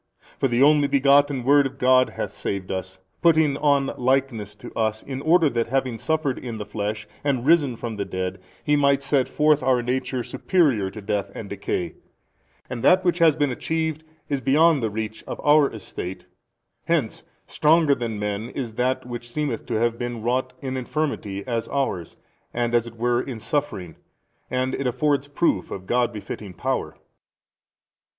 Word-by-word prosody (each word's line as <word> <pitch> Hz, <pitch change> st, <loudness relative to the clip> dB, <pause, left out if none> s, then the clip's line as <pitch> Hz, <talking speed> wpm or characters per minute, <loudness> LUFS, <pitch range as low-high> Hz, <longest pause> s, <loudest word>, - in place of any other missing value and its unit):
For -, -, +3 dB
the 120 Hz, +1 st, +3 dB
Only 145 Hz, 0 st, +5 dB
Begotten 140 Hz, -1 st, +3 dB
Word 140 Hz, +2 st, +5 dB
of 135 Hz, 0 st, -12 dB
God 130 Hz, 0 st, +4 dB
hath -, -, -5 dB
saved 95 Hz, -1 st, -4 dB
us, 95 Hz, 0 st, -4 dB, 0.2 s
putting 160 Hz, -4 st, +4 dB
on 140 Hz, -2 st, +2 dB
likeness 125 Hz, -5 st, 0 dB
to 105 Hz, -, -11 dB
us 110 Hz, -1 st, -1 dB
in 135 Hz, -1 st, -5 dB
order 165 Hz, +2 st, +4 dB
that 115 Hz, -1 st, 0 dB
having 130 Hz, -2 st, -1 dB
suffered 155 Hz, -4 st, 0 dB
in 120 Hz, -3 st, -6 dB
the 105 Hz, -, -5 dB
flesh 105 Hz, +1 st, -4 dB, 0.2 s
and 135 Hz, -4 st, 0 dB
risen 145 Hz, -5 st, +4 dB
from 115 Hz, -1 st, -5 dB
the 100 Hz, -, -1 dB
dead 95 Hz, -1 st, -4 dB, 0.2 s
He 150 Hz, -, +2 dB
might 140 Hz, -1 st, +3 dB
set 135 Hz, -3 st, +2 dB
forth 150 Hz, -1 st, +3 dB
our 130 Hz, -1 st, +2 dB
nature 125 Hz, 0 st, -2 dB
superior 135 Hz, -, +1 dB
to 105 Hz, +1 st, -10 dB
death 100 Hz, -1 st, -1 dB
and 100 Hz, -, -7 dB
decay. 90 Hz, -4 st, -3 dB, 0.7 s
And 125 Hz, -2 st, -5 dB
that 185 Hz, 0 st, +5 dB
which 175 Hz, 0 st, +2 dB
has 160 Hz, -3 st, +5 dB
been 145 Hz, -3 st, +1 dB
achieved 160 Hz, +3 st, -2 dB, 0.2 s
is 140 Hz, -2 st, -1 dB
beyond 150 Hz, +3 st, +4 dB
the 110 Hz, -, 0 dB
reach 110 Hz, +1 st, -5 dB
of -, -, -4 dB
|316 -, -, -10 dB
our 150 Hz, -1 st, +5 dB
estate. 95 Hz, -3 st, -7 dB, 0.6 s
Hence 155 Hz, -10 st, 0 dB, 0.2 s
stronger 155 Hz, -1 st, +3 dB
than 115 Hz, -4 st, -3 dB
men 105 Hz, +2 st, -3 dB
is 120 Hz, -5 st, -5 dB
that 125 Hz, +3 st, 0 dB
which 120 Hz, -1 st, -7 dB
seemeth 140 Hz, -3 st, -3 dB
to -, -, -2 dB
have 115 Hz, +1 st, +1 dB
been 120 Hz, -2 st, -4 dB
wrought 125 Hz, +2 st, 0 dB
in 130 Hz, -1 st, -3 dB
infirmity 125 Hz, -8 st, -3 dB
as 115 Hz, -2 st, -2 dB
ours 115 Hz, -, -2 dB, 0.4 s
and 120 Hz, 0 st, 0 dB
as 120 Hz, -1 st, +2 dB
it 115 Hz, 0 st, -11 dB
were 120 Hz, +1 st, +1 dB
in 125 Hz, -4 st, -6 dB
suffering, 105 Hz, -, -3 dB, 0.5 s
and 130 Hz, +1 st, -1 dB
it 140 Hz, -, -1 dB
affords 145 Hz, +2 st, +1 dB
proof 145 Hz, -, 0 dB
of 95 Hz, -1 st, -7 dB
God 120 Hz, +3 st, +1 dB
befitting 105 Hz, -2 st, -7 dB
power. -, -, -2 dB
125 Hz, 175 wpm, -24 LUFS, 110-145 Hz, 0.7 s, Only